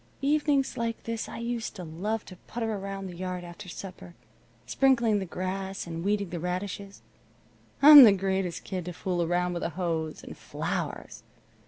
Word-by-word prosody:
Evenings 285 -2 +1
like 230 -1 -3
this 230 -1 -4
I - - -7
used 235 -1 -4
to 185 - -7
love 195 +7 -3
to 185 - -11
putter 225 -2 -3
around 195 -1 -5
the 180 -2 -7
yard 180 0 -4
after 175 +2 -10
supper, 180 -1 -9 0.5
sprinkling 235 -6 +3
the 190 - -4
grass 190 +2 -4
and 165 0 -5
weeding 200 -2 0
the 175 - -3
radishes. 195 +3 -5 0.8
I'm 295 -1 +12
the 220 - +9
greatest 190 -2 -1
kid 185 -3 -4
to 180 - -5
fool 180 0 -2
around 175 +1 0
with 175 - -4
a - - -1
hose. 165 -3 -3
And - - -9
flowers! - - -5
195 Hz, 170 wpm, -28 LUFS, 180-220 Hz, 0.8 s, I'm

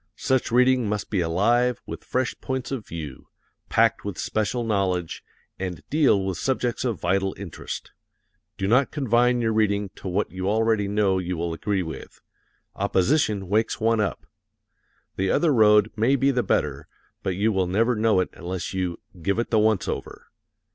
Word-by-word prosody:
Such 130 -3 0
reading 125 -2 +3
must 105 -2 -3
be 100 -4 +1
alive 115 +9 +2
with - - -7
fresh 130 0 -1
points 130 0 -3
of 125 -6 -4
view, 75 -5 -7 0.4
packed - - +3
with 100 -3 -5
special 110 +3 -1
knowledge, 95 -6 -1 0.4
and 90 -2 -5
deal 135 -10 +3
with 95 -2 -3
subjects 125 -3 -1
of 120 -7 -1
vital 95 +2 0
interest. 95 -5 -7 0.7
Do 95 - -1
not 125 +6 +3
confine 125 -3 +2
your 110 -1 +1
reading 105 -2 +1
to - - -8
what 95 +3 -1
you 95 +1 -2
already 110 -1 +2
know 100 -2 +1
you 90 -1 -3
will 85 0 -2
agree 95 +3 -1
with. 80 - -9 0.6
Opposition 105 - +1
wakes 110 +4 0
one 115 0 +2
up. 105 - -2 0.9
The 95 0 0
other 160 - +3
road 105 -2 +5
may 120 +5 +3
be 135 +1 +2
the 125 -2 +1
better, 75 - -1 0.3
but 95 - -2
you 105 +4 +2
will 95 -3 +1
never 115 +7 +2
know 110 -3 +3
it - - -2
unless 90 +1 -5
you 90 -2 -2 0.2
"give 100 +5 0
it 120 - -2
the 110 - +4
once 110 -2 +2
over." - - -6
105 Hz, 170 wpm, -24 LUFS, 95-120 Hz, 0.9 s, road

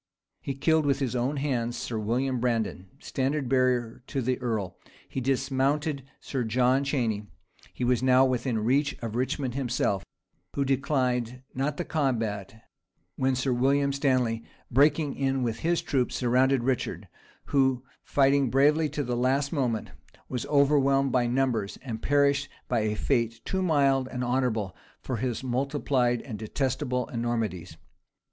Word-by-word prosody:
He 135 - -4
killed 155 +2 +2
with 140 - +3
his 130 -3 -2
own 130 +4 0
hands 120 -4 -1
Sir 115 -1 -3
William 125 +4 0
Brandon, 115 -6 -1
standard 135 0 -2
bearer 125 -3 +1
to 135 - -2
the 130 0 0
earl: 110 -6 -2 0.3
he 130 - -4
dismounted 135 +3 0 0.2
Sir 130 -3 -3
John 125 +4 +2
Cheyney: 115 -7 -1 0.4
he - - -5
was 125 -1 +2
now 130 0 +5
within 125 -2 0
reach 140 +5 +1
of 115 -1 -4
Richmond 130 +1 -1
himself, 120 -7 0 0.5
who 140 - +1
declined 130 -3 0
not 140 +3 -1
the 175 - -3
combat, 115 -8 -2 0.5
when 130 0 +1
Sir 130 0 0
William 140 +3 +2
Stanley, 130 -5 +1 0.3
breaking 145 +2 +3
in 135 -1 0
with 115 -2 -2
his 170 +1 0
troops, 130 -4 0
surrounded 130 +1 +2
Richard, 130 -1 -2 0.5
who, 130 -2 +3 0.2
fighting 140 -1 +3
bravely 150 +4 +3
to 145 +1 -2
the 120 -1 -2
last 135 +4 +1
moment, 125 -7 -1 0.4
was 125 -3 -4
overwhelmed 140 -2 +3
by 125 -1 +2
numbers, 120 -6 0
and 115 -4 -5
perished 140 0 +2 0.2
by - - +1
a 105 0 0
fate 115 -1 0
too 190 - -1
mild 140 -6 +2
and 125 -1 -4
honorable 120 -6 0 0.2
for 130 - -4
his 125 +1 -2
multiplied 130 -1 0
and 110 -6 -7
detestable 125 +2 -1
enormities. 110 -9 -3
130 Hz, 145 wpm, -27 LUFS, 120-140 Hz, 0.5 s, now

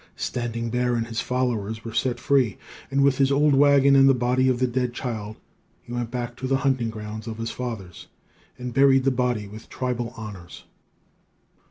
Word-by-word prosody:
Standing 115 -1 -3
Bear 125 0 +1
and 115 -1 -1
his 115 0 -3
followers 115 -4 -2
were 115 - -6
set 120 +1 0
free; 130 -5 +2 0.3
and, 140 +1 +2
with 140 -1 +3
his 135 0 +3
old 145 +1 +4
wagon 140 0 +5
and 135 0 +7
the 135 - +5
body 125 +1 +2
of 125 - +1
the 130 - +1
dead 125 0 -1
child, 110 -4 -4 0.5
he 120 - -9
went 120 -1 -2
back 120 -1 -4
to 130 - -4
the 135 0 +2
hunting 130 -4 +1
grounds 110 0 -7
of 110 -1 -5
his 115 0 -4
fathers, 110 -9 -6 0.5
and 125 -1 -6
buried 135 0 +5
the 135 - +3
body 125 -4 -1
with 110 +2 -12
tribal 125 -2 -3
honors. 105 -6 -9
120 Hz, 190 wpm, -24 LUFS, 115-130 Hz, 0.5 s, and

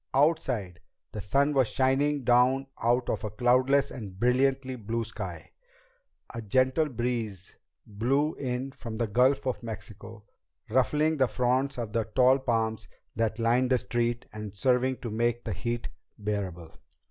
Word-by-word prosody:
Outside, 130 - +1 0.3
the 105 - -5
sun 140 +9 +2
was 135 -4 +3
shining 135 +3 +1
down 125 +3 +4 0.2
out 120 +2 +2
of - - -2
a 110 - -2
cloudless 130 +5 +2
and 100 -6 -8
brilliantly 130 +2 +2
blue 115 0 -3
sky. 115 - -7 0.8
A 115 - -5
gentle 130 +8 +2
breeze 115 -6 -3 0.3
blew 135 +9 0
in 130 0 -3
from 115 -4 -7
the 115 - +1
Gulf 125 +7 +2
of 130 -1 -2
Mexico, 110 -1 -9 0.5
ruffling 150 +5 +2
the 130 -2 +3
fronds 130 +3 0
of 115 -3 -4
the 115 -2 0
tall 130 +1 +5
palms 115 -4 -1 0.3
that 110 -1 0
lined 120 +2 +2
the 130 - +4
streets 120 0 -1
and 105 -2 -7
serving 125 +4 +2
to 115 - -5
make 120 +2 0
the - - -3
heat 120 -1 -3 0.3
bearable. 95 -6 -4
120 Hz, 145 wpm, -28 LUFS, 110-130 Hz, 0.8 s, tall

